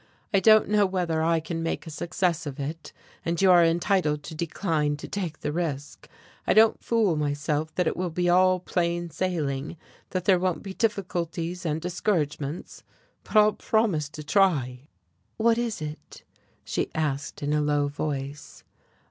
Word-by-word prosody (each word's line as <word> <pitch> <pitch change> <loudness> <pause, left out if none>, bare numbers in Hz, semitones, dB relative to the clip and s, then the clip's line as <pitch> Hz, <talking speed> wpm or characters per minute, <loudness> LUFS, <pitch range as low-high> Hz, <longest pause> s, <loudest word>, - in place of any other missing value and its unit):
I 195 - +5
don't 215 +2 +6
know 210 -1 +3
whether 175 -4 -1
I 165 0 +2
can 165 +1 -4
make 165 - -3
a 160 - -7
success 175 +1 -1
of 140 0 -6
it, 155 +4 -5 0.3
and 170 0 -1
you 190 -1 +5
are 175 -1 +7
entitled 165 -3 +1
to - - -8
decline 155 -2 -1
to - - -8
take 175 -6 -4
the - - -2
risk. 150 -4 -4 0.4
I - - +3
don't 220 +1 +5
fool 220 -7 +2
myself 150 +1 -1
that 180 - +1
it - - 0
will 180 0 -2
be 175 +2 -1
all 185 +1 +4
plain 175 -1 -1
sailing, 155 -3 -2 0.3
that 185 -2 -3
there 185 -2 +5
won't 185 -1 -1
be 195 -2 -6
difficulties 180 -5 -2
and 155 0 -1
discouragements. 165 -4 -2 0.4
But - - -11
I'll 210 0 +6
promise 200 -12 0
to 155 0 -9
try." 145 -7 +1 0.5
"What 230 +1 +3
is 230 -8 -2
it?" 150 0 -9 0.4
she - - -2
asked, 145 -2 -2
in 145 +1 0
a 150 - +2
low 145 -1 +1
voice. 145 0 -5
170 Hz, 165 wpm, -26 LUFS, 150-185 Hz, 0.5 s, are